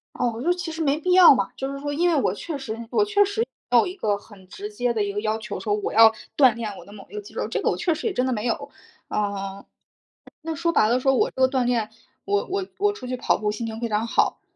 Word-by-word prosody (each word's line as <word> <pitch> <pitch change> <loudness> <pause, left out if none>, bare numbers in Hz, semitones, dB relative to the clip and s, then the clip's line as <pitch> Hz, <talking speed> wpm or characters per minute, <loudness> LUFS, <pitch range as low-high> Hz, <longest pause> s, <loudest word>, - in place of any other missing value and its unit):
哦， 235 -2 -1
就 345 - +1
是 355 - -6
其 330 -2 -4
实 325 0 -3
没 290 0 +1
必 360 +3 0
要 360 -6 +9
嘛， 200 - -1
就 270 +1 -4
是 275 - -6
说 290 +1 -4
因 345 +4 +2
为 340 - +2
我 190 - 0
确 315 +6 -5
实 225 -5 -5
我 420 - +3
确 410 -1 +3
实 405 +3 -3 0.3
没 - - +6
有 - - +4
一 365 - -5
个 210 - 0
很 200 -3 -17
直 410 - -7
接 245 - -1
的 220 - 0
一 200 - -3
个 205 - -2
要 215 0 -1
求， 215 -1 -6
说 205 -2 0
我 210 - -3
要 225 0 +7 0.2
锻 260 -5 +6
炼 225 -3 -4
我 - - -11
的 200 - -15
某 200 -2 -12
一 - - -14
个 420 - -3
肌 - - -14
肉， - - -2
这 - - -2
个 - - +2
我 - - -1
确 335 -3 0
实 315 - -5
也 425 - +1
真 250 -4 0
的 260 - 0
没 215 0 -2
有。 235 - -2 0.4
呃， 200 -1 -3 0.8
那 325 0 -3
说 335 +2 0
白 215 - +4
了 245 +3 +3
说 270 +1 +3
我 - - +2
这 260 - -3
个 260 - +6
锻 260 -2 0
炼， 235 -3 0 0.3
我 405 0 0
我 385 0 -2
我 410 +1 +2
出 330 -11 -9
去 255 0 -3
跑 - - +1
步 210 -1 -1
心 225 +2 -4
情 220 0 -6
非 235 - -2
常 215 +1 0
好， - - +1
250 Hz, 320 characters per minute, -24 LUFS, 215-335 Hz, 0.8 s, 要